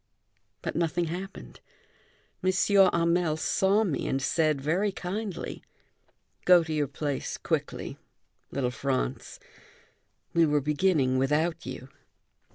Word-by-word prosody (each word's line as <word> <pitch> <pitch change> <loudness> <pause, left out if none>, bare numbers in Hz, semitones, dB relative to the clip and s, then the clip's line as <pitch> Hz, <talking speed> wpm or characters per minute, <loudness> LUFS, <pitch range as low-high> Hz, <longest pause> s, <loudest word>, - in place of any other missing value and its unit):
But - - -3
nothing 170 +1 0
happened, 190 +2 -8 0.8
M. 185 - +3
Hamel 175 -4 +3
saw 195 +6 +2
me 175 -9 -2
and 135 - 0
said 155 +1 +1
very 175 +9 +1
kindly: 195 0 -5 0.8
"Go 180 -2 +6
to 160 -1 -4
your 150 -2 +1
place 145 0 -3
quickly, - - -3 0.5
little 130 -3 -1
Franz. 130 - -3 0.9
We 165 -1 +4
were 150 0 +3
beginning 145 -3 +2
without 155 +4 0
you." 130 0 -7
165 Hz, 110 wpm, -28 LUFS, 140-185 Hz, 0.9 s, Go